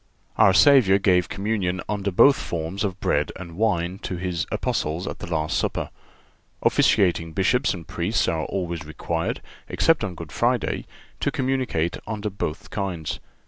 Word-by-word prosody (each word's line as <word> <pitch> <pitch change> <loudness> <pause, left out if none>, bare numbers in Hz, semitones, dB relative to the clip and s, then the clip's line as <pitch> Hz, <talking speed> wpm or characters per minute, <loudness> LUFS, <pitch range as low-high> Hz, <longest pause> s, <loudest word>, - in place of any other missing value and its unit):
Our 95 - +6
Savior 100 -1 +6
gave 90 -2 +2
communion 100 -3 -1
under 100 -1 -1
both 135 +9 +6
forms 85 +2 -4
of 95 -2 -2
bread - - +1
and 85 -2 -9
wine 95 -3 0
to 95 - -4
His 90 -2 -2
Apostles 80 +5 -1
at - - -5
the - - -7
last 80 -1 0
Supper. - - -1 0.7
Officiating 85 -4 +3
Bishops 115 - +2
and 85 -3 -10
Priests 95 +6 0
are 80 -1 0
always 85 -4 -3
required, 80 +2 -3 0.3
except 165 -6 +2
on 95 -4 -3
Good 80 -3 -9
Friday, 120 -3 0 0.3
to - - +1
communicate 130 -11 -1
under 105 -1 -3
both 80 -5 -5
kinds. 90 -7 -3
95 Hz, 150 wpm, -24 LUFS, 85-105 Hz, 0.7 s, Our